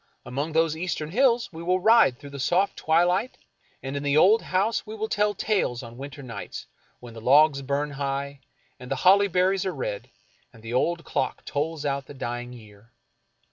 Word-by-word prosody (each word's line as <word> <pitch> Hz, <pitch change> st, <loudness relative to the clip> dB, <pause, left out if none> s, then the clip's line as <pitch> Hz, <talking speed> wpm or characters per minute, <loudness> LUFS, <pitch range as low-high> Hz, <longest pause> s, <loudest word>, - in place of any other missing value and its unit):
Among 140 Hz, +6 st, -4 dB
those 160 Hz, -1 st, +2 dB
eastern 160 Hz, -2 st, -3 dB
hills 235 Hz, -3 st, +2 dB
we 160 Hz, -, -8 dB
will 180 Hz, +2 st, +1 dB
ride 220 Hz, -, +5 dB
through 145 Hz, +1 st, -12 dB
the 140 Hz, -, -8 dB
soft 180 Hz, +8 st, +1 dB
twilight, 175 Hz, +8 st, +1 dB, 0.5 s
and 135 Hz, +1 st, -5 dB
in 140 Hz, -, -2 dB
the 145 Hz, +1 st, +1 dB
old 205 Hz, +8 st, +6 dB
house 200 Hz, +5 st, 0 dB
we 215 Hz, 0 st, -8 dB
will 220 Hz, 0 st, -3 dB
tell 210 Hz, -1 st, 0 dB
tales 180 Hz, -, -1 dB
on 115 Hz, 0 st, -10 dB
winter 140 Hz, +2 st, -9 dB
nights, 115 Hz, -5 st, -7 dB, 0.3 s
when 120 Hz, -2 st, -11 dB
the 115 Hz, -, -10 dB
logs 140 Hz, +3 st, +5 dB
burn 140 Hz, +2 st, -2 dB
high, 140 Hz, 0 st, -4 dB, 0.4 s
and 125 Hz, 0 st, -10 dB
the -, -, 0 dB
holly 200 Hz, +2 st, +6 dB
berries 185 Hz, +1 st, +1 dB
are 190 Hz, -, -3 dB
red, -, -, -5 dB, 0.4 s
and 115 Hz, -4 st, -18 dB
the 115 Hz, +1 st, -6 dB
old 170 Hz, +6 st, 0 dB
clock 130 Hz, -, -2 dB
tolls 150 Hz, +1 st, -3 dB
out 140 Hz, -1 st, -2 dB
the 145 Hz, -, -11 dB
dying 120 Hz, -1 st, -5 dB
year. 110 Hz, -2 st, -15 dB
150 Hz, 190 wpm, -25 LUFS, 135-185 Hz, 0.5 s, old